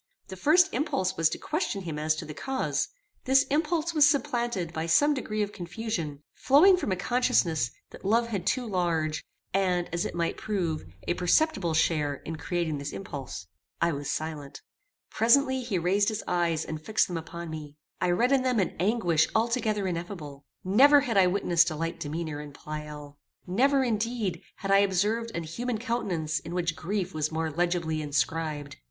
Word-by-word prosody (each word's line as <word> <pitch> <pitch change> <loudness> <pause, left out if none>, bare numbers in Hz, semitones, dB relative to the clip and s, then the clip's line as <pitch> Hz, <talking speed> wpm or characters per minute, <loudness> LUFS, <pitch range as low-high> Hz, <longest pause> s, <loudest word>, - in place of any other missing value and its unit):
The 190 - -6
first 340 - +4
impulse 245 - 0
was 165 -1 +3
to - - -4
question 300 - -2
him 160 -4 -4
as 155 0 +1
to - - -6
the 150 - -7
cause. 265 - -1 0.4
This 270 0 +5
impulse 325 +2 +1
was 295 -2 +6
supplanted 240 - -1
by 160 0 -3
some 290 - +4
degree 215 -6 -2
of 205 - -4
confusion, 175 -6 -4
flowing 315 +9 +6
from 360 - -2
a - - +2
consciousness 180 - +1 0.2
that - - -12
love 230 +4 +2
had 195 -4 -3
too 250 +5 +1
large, 170 -6 -1 0.3
and, 180 -2 +1
as 170 - 0
it - - -4
might 170 -1 -1
prove, 175 - -2 0.2
a - - +2
perceptible 180 - +2
share 150 -3 +1
in 160 +3 -7
creating 160 -1 -2
this 140 +1 -5
impulse. 135 - -6 0.3
I 170 0 +2
was 145 -2 -4
silent. 155 -3 -5 0.5
Presently 260 +3 +3
he 235 -6 -2
raised 195 +5 +2
his 215 - -4
eyes 170 -3 0
and 155 -1 -5
fixed 220 +6 +2
them 175 - -3
upon 170 0 -7
me. 150 -2 -8 0.2
I 180 - +2
read 235 +9 +2
in 275 -1 +4
them 255 -3 +1
an 190 - 0
anguish 180 -6 +2
altogether 220 -3 +1
ineffable. 170 -6 -5 0.2
Never 275 +10 +6
had 245 -5 -2
I 190 -2 +6
witnessed 175 -2 +3
a 155 - -5
like 165 +2 -3
demeanour 155 0 -4
in 145 -1 -10
Pleyel. 150 -1 -8 0.3
Never, 265 +9 +3
indeed, 220 -6 -1
had 195 0 -4
I 195 - +7
observed 205 +4 +1
an 170 - -2
human 230 +9 -3
countenance 190 -10 -2
in 165 +2 -7
which 170 -3 0
grief 190 +1 -3
was 155 0 -1
more 160 0 -2
legibly 170 -1 0
inscribed. 150 +1 -2
180 Hz, 180 wpm, -28 LUFS, 160-230 Hz, 0.5 s, I